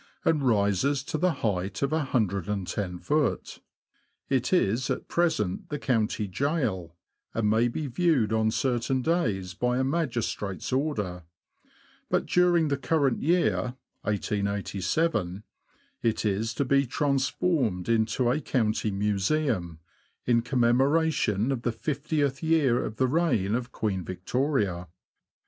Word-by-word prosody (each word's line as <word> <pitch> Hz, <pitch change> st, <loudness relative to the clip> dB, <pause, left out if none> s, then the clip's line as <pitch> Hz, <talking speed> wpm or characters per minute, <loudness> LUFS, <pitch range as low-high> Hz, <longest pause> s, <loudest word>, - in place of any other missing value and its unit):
and 160 Hz, -3 st, +3 dB
rises 115 Hz, +3 st, +2 dB
to 145 Hz, -, -5 dB
the 180 Hz, +4 st, +2 dB
height 95 Hz, +2 st, -1 dB
of 140 Hz, -, 0 dB
iioft. 105 Hz, -, -1 dB, 0.7 s
It 130 Hz, -2 st, +1 dB
is 130 Hz, -, +2 dB
at -, -, -2 dB
present 155 Hz, -, 0 dB
the 150 Hz, -, -2 dB
county 115 Hz, -5 st, 0 dB
gaol, 105 Hz, -, -1 dB, 0.4 s
and 115 Hz, -2 st, +1 dB
may 110 Hz, +3 st, +3 dB
be 145 Hz, +6 st, -3 dB
viewed 135 Hz, -, +1 dB
on 110 Hz, 0 st, +2 dB
certain 125 Hz, +2 st, 0 dB
days 110 Hz, -, 0 dB
by 125 Hz, +6 st, 0 dB
a 130 Hz, -, +1 dB
magistrate's 120 Hz, -, -2 dB
order; 105 Hz, -, -1 dB, 0.9 s
but -, -, +1 dB
during 175 Hz, -3 st, +3 dB
the 140 Hz, -, 0 dB
current 140 Hz, -2 st, +1 dB
year 125 Hz, -, +1 dB, 0.3 s
(1887) 100 Hz, -, -1 dB, 0.6 s
it 115 Hz, -1 st, 0 dB
is 105 Hz, +3 st, 0 dB
to 140 Hz, -, 0 dB
be 140 Hz, +1 st, +2 dB
transformed 135 Hz, -, 0 dB
into 115 Hz, +2 st, +2 dB
a 150 Hz, -, 0 dB
county 110 Hz, -5 st, 0 dB
museum, 100 Hz, -, 0 dB, 0.5 s
in 120 Hz, -1 st, +3 dB
commemoration 125 Hz, -1 st, +2 dB
of 130 Hz, -4 st, -2 dB
the 120 Hz, -, 0 dB
fiftieth 140 Hz, +1 st, -1 dB
year 155 Hz, -7 st, +2 dB
of 105 Hz, -, -5 dB
the 130 Hz, -, +2 dB
reign 125 Hz, -, +1 dB
of 125 Hz, +1 st, -2 dB
Queen 95 Hz, -4 st, -2 dB
Victoria. 95 Hz, -, -1 dB
120 Hz, 120 wpm, -27 LUFS, 100-145 Hz, 0.9 s, and